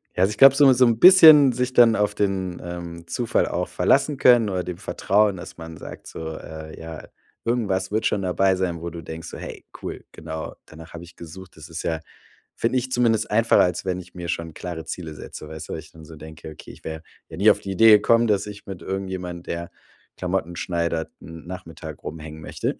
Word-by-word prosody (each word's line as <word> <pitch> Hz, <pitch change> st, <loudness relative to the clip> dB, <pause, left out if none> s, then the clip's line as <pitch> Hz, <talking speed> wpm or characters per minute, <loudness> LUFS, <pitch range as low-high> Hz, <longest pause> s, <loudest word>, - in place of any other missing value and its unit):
Ja, 90 Hz, -, +4 dB
ich 105 Hz, +1 st, -3 dB
glaube 135 Hz, 0 st, +8 dB
so 140 Hz, -1 st, +6 dB
mit 130 Hz, -, +6 dB
so 125 Hz, +1 st, +5 dB
'n 115 Hz, -1 st, +1 dB
bisschen 160 Hz, -7 st, +9 dB
sich 125 Hz, +1 st, -1 dB
dann 115 Hz, -2 st, +6 dB
auf 105 Hz, 0 st, +1 dB
den, 95 Hz, -3 st, -1 dB
ähm, 85 Hz, -1 st, -8 dB
Zufall 115 Hz, +6 st, 0 dB
auch -, -, -3 dB
verlassen 140 Hz, +1 st, +2 dB
können 120 Hz, -5 st, +5 dB
oder 90 Hz, -1 st, -1 dB
dem 90 Hz, -2 st, -5 dB
Vertrauen, 100 Hz, +1 st, +1 dB
dass -, -, -10 dB
man 80 Hz, -1 st, -9 dB
sagt -, -, -10 dB
so: 80 Hz, -1 st, -7 dB
„Äh, 80 Hz, 0 st, -9 dB
ja, 80 Hz, -1 st, -9 dB, 0.4 s
irgendwas 100 Hz, -6 st, -1 dB
wird 110 Hz, +1 st, 0 dB
schon 100 Hz, -, +1 dB
dabei 95 Hz, +1 st, +2 dB
sein, 85 Hz, -3 st, -2 dB
wo 85 Hz, -, -4 dB
du 85 Hz, 0 st, -8 dB
denkst, 80 Hz, +1 st, -8 dB
so, -, -, -8 dB
'Hey, -, -, -9 dB, 0.2 s
cool. -, -, -6 dB
Genau 80 Hz, 0 st, -7 dB
danach 80 Hz, +1 st, -13 dB
habe 85 Hz, 0 st, -8 dB
ich 85 Hz, -, -17 dB
gesucht.'“ 90 Hz, +2 st, -11 dB
Das 80 Hz, +1 st, -12 dB
ist 80 Hz, -, -6 dB
ja 80 Hz, -1 st, -2 dB, 0.5 s
finde 115 Hz, +3 st, 0 dB
ich 130 Hz, +1 st, -3 dB
zumindest 115 Hz, -3 st, +1 dB
einfacher, 115 Hz, +2 st, +4 dB
als 90 Hz, +1 st, 0 dB
wenn 90 Hz, -1 st, -2 dB
ich 90 Hz, -, -17 dB
mir 90 Hz, -1 st, -7 dB
schon 85 Hz, -1 st, -4 dB
klare 85 Hz, -1 st, -6 dB
Ziele 80 Hz, -1 st, -6 dB
setze, 75 Hz, -, -9 dB
weißt 80 Hz, 0 st, -9 dB
du? -, -, -4 dB
Wo -, -, -4 dB
ich -, -, -11 dB
dann 80 Hz, -, -14 dB
so 80 Hz, 0 st, -12 dB
denke: 80 Hz, 0 st, -10 dB
„Okay, 75 Hz, -, -12 dB
ich -, -, -17 dB
wäre 80 Hz, 0 st, -6 dB, 0.3 s
wäre 80 Hz, -, -9 dB
nie 105 Hz, -, +7 dB
auf -, -, +4 dB
die 95 Hz, -, -5 dB
Idee 110 Hz, +4 st, +6 dB
gekommen, 115 Hz, +3 st, +5 dB
dass 105 Hz, -1 st, +1 dB
ich 105 Hz, 0 st, -10 dB
mit 95 Hz, -3 st, -8 dB
irgendjemand, 95 Hz, -2 st, -5 dB
der 85 Hz, 0 st, -5 dB, 0.5 s
Klamotten 90 Hz, -2 st, -2 dB
schneidert, 85 Hz, -2 st, -2 dB
'n 80 Hz, +1 st, -11 dB
Nachmittag 85 Hz, -4 st, -9 dB
rumhängen 80 Hz, 0 st, -8 dB
möchte.“ -, -, -3 dB
90 Hz, 220 wpm, -23 LUFS, 80-105 Hz, 0.5 s, bisschen